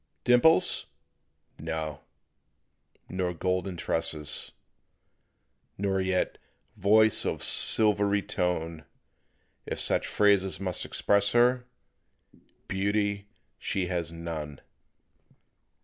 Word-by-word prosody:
"Dimples?" 125 -1 +2 0.7
No; 80 -1 -5 1.1
nor 90 -1 -4
"golden 90 +1 -3
tresses," 80 -3 -3 1.3
Nor 95 -1 -1
yet 95 -1 -2 0.4
"voice 110 +2 +4
of - - -3
silvery 105 -2 +6
tone"; 80 -3 -3 0.8
If - - -5
such - - 0
phrases 100 -2 +1
must 95 -3 -4
express 100 0 0
her, 125 +1 +2 1.0
Beauty 100 +1 -2 0.3
she 90 -2 -3
has 85 -3 -3
none. 80 -4 -7
95 Hz, 80 wpm, -27 LUFS, 85-100 Hz, 1.3 s, silvery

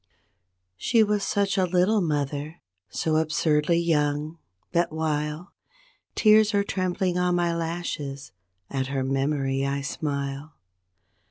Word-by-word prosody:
She 225 - +3
was 210 -1 0
such 200 -1 0
a 185 - +3
little 185 +4 +2
mother, 150 0 -2 0.3
so 155 -1 0
absurdly 155 0 +2
young, 155 -1 0 0.3
that 170 -1 +1
while 155 +2 -2 0.6
Tears 215 -1 +5
are 200 - +3
trembling 185 -2 -1
on 180 0 +2
my 170 -1 +1
lashes, 165 -5 -4 0.4
at 130 +1 -2
her 135 -1 -2
memory 135 0 0
I 140 0 -1
smile. 140 +1 -4
160 Hz, 115 wpm, -25 LUFS, 145-180 Hz, 0.6 s, Tears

